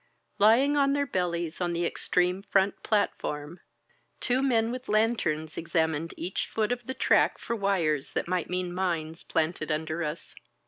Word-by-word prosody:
Lying 240 +8 +5
on 275 -1 +3
their 285 0 +1
bellies 175 - -2
on 175 -1 0
the 170 0 0
ex - - -3
treme 180 +2 +2
front 195 0 +2
platform, 170 -6 -1 0.6
two 255 +1 +1
men 230 -4 +2
with 255 +1 -6
lanterns 205 -8 +1
examined 160 -1 -1
each 180 +3 -3
foot 220 +1 -1
of 245 -1 -3
the 260 - -3
track - - +3
for 235 - -3
wires 175 -9 0
that - - -1
might 180 -1 -1
mean 180 -1 -2
mines 165 -3 -2
planted 160 -1 -1
under 155 +2 -1
us. 150 +1 -5
180 Hz, 165 wpm, -28 LUFS, 160-225 Hz, 0.6 s, Lying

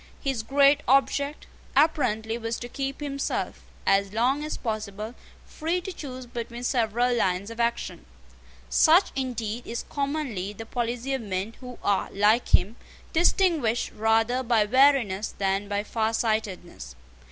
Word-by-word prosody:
His 270 -5 -1
great 280 +4 +4
object, 280 +2 +2 0.3
apparently, 245 -7 +2
was 230 0 -3
to 240 - -6
keep 275 +3 -4
himself, 275 -1 -3 0.2
as 195 0 +2
long 255 +6 +1
as 305 - -4
possible, 215 -1 -4 0.3
free 330 +3 -2
to 370 +1 -6
choose 255 -6 -7
between 235 0 -6
several 245 0 +1
lines 195 -1 0
of 230 - -9
action. 235 0 -1 0.6
Such, 340 +4 +5
indeed, 240 -3 -3
is 235 - -4
commonly 275 -9 -2
the 225 +2 -8
policy 240 +3 -2
of 265 - -1
men 200 +1 -3
who 250 -2 -9
are, 200 -2 +1
like 210 +4 +3
him, 210 +6 +3 0.4
distinguished 325 - +2
rather 225 +3 +2
by 230 -4 +2
wariness 240 -4 +3
than 195 +1 0
by 205 0 -1
farsightedness. 220 - -2
235 Hz, 135 wpm, -26 LUFS, 215-275 Hz, 0.6 s, Such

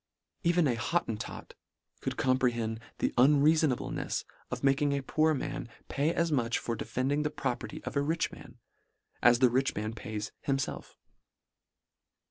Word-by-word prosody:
Even 170 -2 +3
a 125 - +2
Hottentot 115 -2 -3 0.5
could - - -3
comprehend 120 -4 +1 0.2
the - - 0
un 140 +3 +6
reafonablenefs, 155 -4 +1 0.3
of - - -5
making 140 +1 +3
a 140 -1 -1
poor 155 +3 +2
man 140 -2 -4 0.2
pay 145 +3 +1
as 170 -1 0
much 120 -5 +1
for 115 - -2
defending 130 +6 -1
the 150 - 0
property 150 +2 -4
of - - -5
a 140 - +3
rich 160 +3 0
man, - - -12 0.6
as 120 0 +6
the 130 0 +5
rich 130 +2 +1
man 110 +2 -3
pays 105 -1 -5 0.2
himfelf. 135 -1 -2
135 Hz, 145 wpm, -30 LUFS, 120-150 Hz, 0.6 s, un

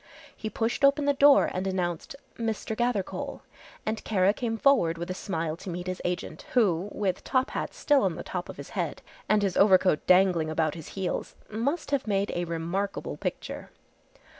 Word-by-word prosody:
He 220 - -5
pushed 225 +5 -2
open 280 +1 +5
the 285 - +4
door 280 0 +6
and 185 +1 -2
announced, 180 - -2 0.2
"Mr. 225 -1 -3
Gathercole," 240 -5 -2 0.4
and 220 0 -2
Kara 195 -2 +3
came 225 -1 -2
forward 220 -11 +3
with 170 +2 -4
a - - -1
smile 165 -5 -3
to 185 - -8
meet 175 0 -4
his 185 0 -4
agent, 175 -3 -3
who, 200 -6 +2
with 195 -3 -2
top 260 -1 +1
hat - - -4
still 290 -2 +3
on 185 -4 +1
the - - -6
top 180 -1 -5
of - - -8
his - - -9
head, - - -3 0.3
and 210 -1 +4
his 195 -2 0
overcoat 190 -5 +4
dangling 180 -4 +4
about 155 -1 0
his 160 -3 -9
heels, 190 -2 -3 0.2
must 280 +10 -2
have 275 -4 0
made 200 0 +1
a 175 0 -1
remarkable 170 +4 -3
picture. - - -5
195 Hz, 185 wpm, -28 LUFS, 175-225 Hz, 0.4 s, door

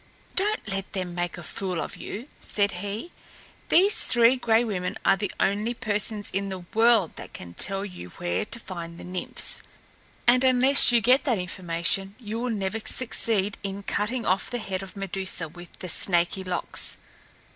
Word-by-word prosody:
"Don't 415 - 0
let 195 -1 -3
them 185 -2 -3
make 175 0 -3
a 175 - -8
fool 185 +1 -4
of - - -5
you!" 235 +7 -7
said 205 -1 +1
he. 205 - -6 0.6
"These 395 +5 +5
Three 240 +1 +5
Gray 230 -2 +2
Women 185 -6 -3
are 195 - +5
the 200 +1 -3
only 210 +5 0
persons 210 -1 -1
in 195 +1 -1
the 185 -2 -6
world 225 -5 +4
that - - -9
can 85 -1 -9
tell 195 - -2
you 180 - -9
where 85 0 -1
to 235 - -4
find 170 -5 -7
the - - -9
Nymphs, 180 0 -1 0.6
and 250 +2 +5
unless 260 +1 +7
you 235 -1 +4
get 250 +5 +4
that 245 -6 +2
information 180 +1 -2
you 225 -1 -5
will 250 +1 -2
never 210 -1 -2
succeed 220 -4 0
in 200 0 -4
cutting 225 +4 -1
off 185 +2 +1
the 245 - -2
head 195 -4 -4
of 195 +1 -10
Medusa 190 -3 +1
with 175 +2 -13
the 185 - -7
snaky 175 +2 +2
locks. 185 -1 -1
200 Hz, 175 wpm, -26 LUFS, 185-230 Hz, 0.6 s, unless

